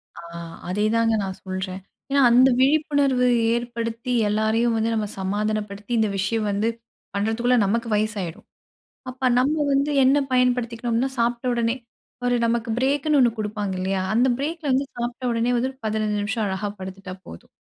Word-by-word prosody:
ஆ, -, -, -9 dB, 0.5 s
அதேதாங்க 220 Hz, +4 st, +2 dB
நான் 190 Hz, -1 st, -5 dB
சொல்றேன். 185 Hz, 0 st, -5 dB, 0.3 s
ஏன்னா, 280 Hz, 0 st, +3 dB
அந்த 255 Hz, +2 st, +6 dB
விழிப்புணர்வு 280 Hz, -2 st, +3 dB, 0.3 s
ஏற்படுத்தி, 235 Hz, +1 st, -3 dB, 0.2 s
எல்லாரையும் 220 Hz, +2 st, +1 dB
வந்து 225 Hz, +1 st, 0 dB
நம்ம 215 Hz, -1 st, -1 dB
சமாதானப்படுத்தி, 205 Hz, +2 st, -3 dB
இந்த 220 Hz, -1 st, +2 dB
விஷயம் 210 Hz, +3 st, 0 dB
வந்து 205 Hz, +3 st, 0 dB, 0.5 s
பண்றதுக்குள்ள 225 Hz, +4 st, +1 dB
நமக்கு 230 Hz, +4 st, 0 dB
வயசு 215 Hz, +1 st, 0 dB
ஆயிடும். 170 Hz, -2 st, -7 dB, 0.6 s
அப்ப 255 Hz, 0 st, 0 dB
நம்ம 275 Hz, +4 st, +2 dB, 0.2 s
வந்து 280 Hz, +2 st, +2 dB
என்ன 265 Hz, +2 st, +5 dB, 0.2 s
பயன்படுத்திக்கணும்னா, 245 Hz, 0 st, +1 dB
சாப்ட்ட 240 Hz, +1 st, 0 dB
உடனே 230 Hz, 0 st, +1 dB, 0.5 s
ஒரு 245 Hz, -, +2 dB
நமக்கு 230 Hz, 0 st, -1 dB
பிரேக்குன்னு 285 Hz, +3 st, +2 dB
ஒண்ணு 245 Hz, -2 st, +5 dB
குடுப்பாங்க 210 Hz, -2 st, -3 dB
இல்லையா? 190 Hz, 0 st, -1 dB
அந்த 240 Hz, +3 st, +4 dB
பிரேக்கில 305 Hz, +1 st, -3 dB
வந்து 265 Hz, +2 st, +2 dB
சாப்பிட்டோடனே 240 Hz, 0 st, -1 dB
வந்து 250 Hz, +2 st, 0 dB
ஒரு 265 Hz, -, -28 dB
15 215 Hz, -1 st, -1 dB
நிமிஷம் 215 Hz, +2 st, -1 dB
அழகா 190 Hz, +1 st, -2 dB
படுத்துட்டா 190 Hz, 0 st, -7 dB
போதும். 85 Hz, -, -11 dB
230 Hz, 145 wpm, -23 LUFS, 210-250 Hz, 0.6 s, அந்த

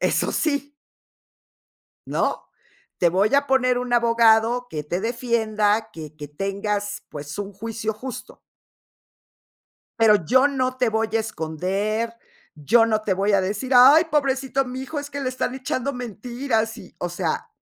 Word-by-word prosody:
eso -, -, +1 dB
sí. 285 Hz, -2 st, -1 dB, 1.3 s
¿No? -, -, -1 dB, 0.5 s
Te 175 Hz, -, +4 dB
voy 200 Hz, +8 st, +2 dB
a 285 Hz, 0 st, +3 dB
poner 255 Hz, -2 st, +3 dB
un 250 Hz, 0 st, -4 dB
abogado 235 Hz, 0 st, +3 dB
que 150 Hz, -, -4 dB
te 175 Hz, +4 st, -2 dB
defienda. 220 Hz, -2 st, 0 dB
Que 155 Hz, -2 st, -9 dB
que 150 Hz, -1 st, -8 dB
tengas, 200 Hz, +5 st, -3 dB
pues, 145 Hz, +2 st, -7 dB
un 205 Hz, 0 st, -5 dB
juicio 220 Hz, +2 st, -4 dB
justo. 250 Hz, +4 st, -9 dB, 1.6 s
Pero, 210 Hz, -6 st, +5 dB
yo 260 Hz, -, +5 dB
no 255 Hz, -2 st, -1 dB
te 250 Hz, -2 st, +1 dB
voy 220 Hz, 0 st, 0 dB
a -, -, +2 dB
esconder, 205 Hz, +4 st, -2 dB, 0.4 s
yo 225 Hz, +11 st, +4 dB
no 220 Hz, -1 st, +1 dB
te 205 Hz, -3 st, 0 dB
voy 200 Hz, +2 st, +1 dB
a 200 Hz, -, +4 dB
decir: 210 Hz, +8 st, -3 dB
"Ay, 275 Hz, +7 st, +8 dB
pobrecito 270 Hz, -2 st, +1 dB
mijo, 260 Hz, +4 st, -5 dB
es 285 Hz, -, -5 dB
que 285 Hz, -, -5 dB
le 265 Hz, -, -1 dB
están 255 Hz, 0 st, -3 dB
echando 265 Hz, +1 st, -2 dB
mentiras", 240 Hz, -1 st, -3 dB
y, 185 Hz, -, -13 dB
o 175 Hz, -, -2 dB
sea, 175 Hz, -, -3 dB
225 Hz, 150 wpm, -23 LUFS, 205-255 Hz, 1.6 s, Ay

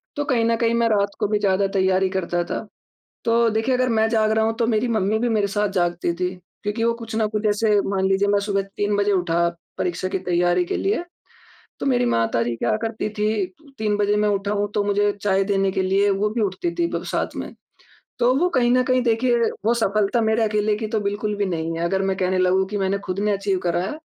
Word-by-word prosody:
तो 290 Hz, -, -2 dB
कहीं 235 Hz, -5 st, +1 dB
न 230 Hz, -, +2 dB
कहीं 230 Hz, 0 st, +1 dB
मैं 235 Hz, 0 st, +2 dB
रात 200 Hz, -1 st, +1 dB
को 210 Hz, -, +1 dB
भी 210 Hz, 0 st, 0 dB
ज़्यादा 195 Hz, -1 st, +2 dB
तैयारी 190 Hz, 0 st, +2 dB
करता 175 Hz, -2 st, -1 dB
था, 220 Hz, -, -5 dB, 0.6 s
तो 230 Hz, 0 st, +3 dB
देखिए 225 Hz, +4 st, 0 dB
अगर 255 Hz, 0 st, +1 dB
मैं 220 Hz, -1 st, +2 dB
जाग 220 Hz, -2 st, +2 dB
रहा 220 Hz, 0 st, +2 dB
हूँ 225 Hz, -, 0 dB
तो 235 Hz, -, +2 dB
मेरी 225 Hz, +2 st, +1 dB
मम्मी 215 Hz, -1 st, +1 dB
भी 240 Hz, -, +1 dB
मेरे 210 Hz, -3 st, +2 dB
साथ 205 Hz, 0 st, 0 dB
जागती 175 Hz, 0 st, 0 dB
थी 180 Hz, +1 st, -1 dB, 0.3 s
क्योंकि 210 Hz, +3 st, -1 dB
वो 235 Hz, -, +3 dB
कुछ 230 Hz, -1 st, -8 dB
ना 220 Hz, -1 st, +2 dB
कुछ 215 Hz, 0 st, 0 dB
ऐसे 210 Hz, 0 st, +2 dB
मान 190 Hz, -1 st, 0 dB
लीजिए 195 Hz, +1 st, +2 dB
मैं 205 Hz, -, +3 dB
सुबह 200 Hz, -1 st, 0 dB, 0.2 s
3 205 Hz, 0 st, +1 dB
बजे 205 Hz, 0 st, +2 dB
उठा 170 Hz, -2 st, +1 dB, 0.3 s
परीक्षा 180 Hz, +1 st, -2 dB
की 190 Hz, -, -2 dB
तैयारी 175 Hz, 0 st, +1 dB
के -, -, -2 dB
लिए, 390 Hz, -3 st, -1 dB, 0.8 s
तो -, -, -3 dB
मेरी 245 Hz, -2 st, +2 dB
माताजी 115 Hz, -, 0 dB
क्या 215 Hz, -, 0 dB
करती 225 Hz, -1 st, -2 dB
थी 210 Hz, -, +2 dB, 0.5 s
3 210 Hz, -1 st, 0 dB
बजे 205 Hz, 0 st, +2 dB
मैं 210 Hz, 0 st, +2 dB
उठा 200 Hz, 0 st, -1 dB
हूँ 205 Hz, 0 st, -1 dB
तो 205 Hz, -, +1 dB
मुझे 205 Hz, 0 st, +2 dB
चाय 195 Hz, -1 st, +2 dB
देने 195 Hz, -1 st, +1 dB
के 190 Hz, -, 0 dB
लिए 195 Hz, +2 st, +2 dB
वो 200 Hz, +2 st, 0 dB
भी 230 Hz, +2 st, -2 dB
उठती 205 Hz, -, -2 dB
थी 340 Hz, -, +2 dB
भग -, -, -3 dB
साथ -, -, -2 dB
में। -, -, -6 dB, 0.7 s
तो 245 Hz, +2 st, +4 dB
वो 355 Hz, +6 st, +2 dB
कहीं 240 Hz, -2 st, +3 dB
न 255 Hz, 0 st, +4 dB
कहीं 255 Hz, -1 st, +2 dB
देखिए 240 Hz, +1 st, +2 dB, 0.3 s
वो 235 Hz, -, +4 dB
सफलता 215 Hz, 0 st, +1 dB
मेरे 220 Hz, +1 st, +2 dB
अकेले 210 Hz, 0 st, +1 dB
की 220 Hz, -, -3 dB
तो 220 Hz, -, +1 dB
बिल्कुल 205 Hz, +1 st, -2 dB
भी 205 Hz, -1 st, 0 dB
नहीं 165 Hz, -2 st, -3 dB
है। 170 Hz, -, -1 dB
अगर 190 Hz, +2 st, 0 dB
मैं 195 Hz, 0 st, 0 dB
कहने 185 Hz, 0 st, 0 dB
लगूँ 185 Hz, +1 st, +3 dB
की 210 Hz, -, -4 dB
मैंने 195 Hz, 0 st, 0 dB
खुद 185 Hz, +1 st, -3 dB
ने 210 Hz, 0 st, +1 dB
अचीव 195 Hz, -1 st, 0 dB
करा 175 Hz, 0 st, +1 dB
है, 300 Hz, +10 st, -5 dB
205 Hz, 240 wpm, -22 LUFS, 190-225 Hz, 0.8 s, तो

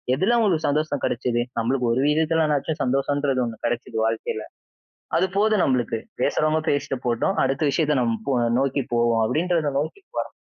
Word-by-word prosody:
எதில 190 Hz, -, +2 dB
அவங்களுக்கு 190 Hz, -9 st, +2 dB
சந்தோஷம் 150 Hz, -1 st, -1 dB
கிடைச்சது? 120 Hz, 0 st, 0 dB, 0.2 s
நம்மளுக்கு 125 Hz, +1 st, 0 dB
ஒரு 130 Hz, -, +1 dB
விதத்துலனாச்சும் 155 Hz, -1 st, +1 dB
சந்தோஷம்ன்றது 135 Hz, 0 st, 0 dB
1 115 Hz, -2 st, -8 dB
கிடைச்சிது 120 Hz, -1 st, -3 dB
வாழ்க்கையில. 110 Hz, -1 st, -2 dB, 0.7 s
அது 175 Hz, -, +3 dB
போதும் 215 Hz, -1 st, +3 dB
நம்மளுக்கு, 125 Hz, -3 st, 0 dB, 0.2 s
பேசுறவங்க 155 Hz, +4 st, +2 dB
பேசிட்டு 140 Hz, -2 st, -1 dB
போட்டும். 120 Hz, +11 st, 0 dB
அடுத்த 135 Hz, +3 st, -1 dB
விஷயத்த 150 Hz, -1 st, +1 dB
நம் 115 Hz, -2 st, -1 dB
போ 140 Hz, -, +1 dB, 0.3 s
நோக்கி 135 Hz, 0 st, 0 dB
போவோம் 120 Hz, -1 st, +2 dB
அப்படின்றத 165 Hz, +3 st, 0 dB
நோக்கி 155 Hz, -, -4 dB
போறான் -, -, -3 dB
140 Hz, 150 wpm, -23 LUFS, 120-155 Hz, 0.7 s, அது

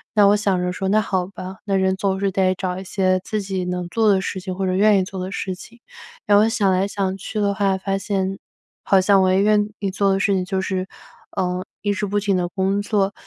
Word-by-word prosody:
那 205 Hz, -1 st, +6 dB
我 205 Hz, -, +5 dB
想 200 Hz, -3 st, +1 dB
着 180 Hz, 0 st, -1 dB
说 190 Hz, +1 st, -3 dB
那 215 Hz, +2 st, +4 dB
好 185 Hz, -3 st, -1 dB
吧， 190 Hz, 0 st, -8 dB
那 200 Hz, -2 st, 0 dB
人 190 Hz, 0 st, +2 dB
总 190 Hz, -1 st, -1 dB
是 195 Hz, -1 st, 0 dB
得 185 Hz, -1 st, +2 dB
找 185 Hz, -1 st, -3 dB
一 -, -, -7 dB
些 185 Hz, -1 st, +1 dB
自 215 Hz, +1 st, -2 dB
己 190 Hz, -2 st, -3 dB
能 180 Hz, 0 st, -3 dB
做 225 Hz, +1 st, +2 dB
的 195 Hz, -2 st, +4 dB
事 190 Hz, -, -4 dB
情， 185 Hz, 0 st, -5 dB
或 190 Hz, +1 st, -2 dB
者 185 Hz, -, 0 dB
愿 205 Hz, +2 st, +4 dB
意 -, -, +1 dB
做 190 Hz, -1 st, -6 dB
的 185 Hz, -, -5 dB
事 190 Hz, -1 st, -3 dB
情。 235 Hz, +6 st, -14 dB, 0.5 s
然 205 Hz, 0 st, +5 dB
后 220 Hz, +2 st, +4 dB
想 200 Hz, -4 st, +2 dB
来 185 Hz, +2 st, +1 dB
想 195 Hz, -2 st, -2 dB
去 215 Hz, +2 st, -5 dB
的 200 Hz, -1 st, +1 dB
话 195 Hz, -2 st, +1 dB
发 195 Hz, +1 st, -2 dB
现， 195 Hz, -1 st, -2 dB, 0.4 s
好 195 Hz, -, +4 dB
像 195 Hz, +1 st, +4 dB
我 185 Hz, 0 st, +3 dB
也 190 Hz, -, +3 dB
愿 210 Hz, 0 st, +3 dB
意 200 Hz, -1 st, -2 dB
做 195 Hz, +1 st, +1 dB
的 195 Hz, -, +1 dB
事 200 Hz, 0 st, +2 dB
情 185 Hz, -1 st, +1 dB
就 190 Hz, 0 st, -2 dB
是， 190 Hz, -1 st, -2 dB, 0.5 s
呃， 180 Hz, -1 st, -1 dB, 0.2 s
一 205 Hz, 0 st, 0 dB
直 205 Hz, +1 st, -2 dB
不 205 Hz, +1 st, 0 dB
停 200 Hz, -2 st, 0 dB
地 175 Hz, -1 st, 0 dB
工 195 Hz, +2 st, 0 dB
作。 205 Hz, -1 st, 0 dB
195 Hz, 275 characters per minute, -21 LUFS, 185-205 Hz, 0.5 s, 那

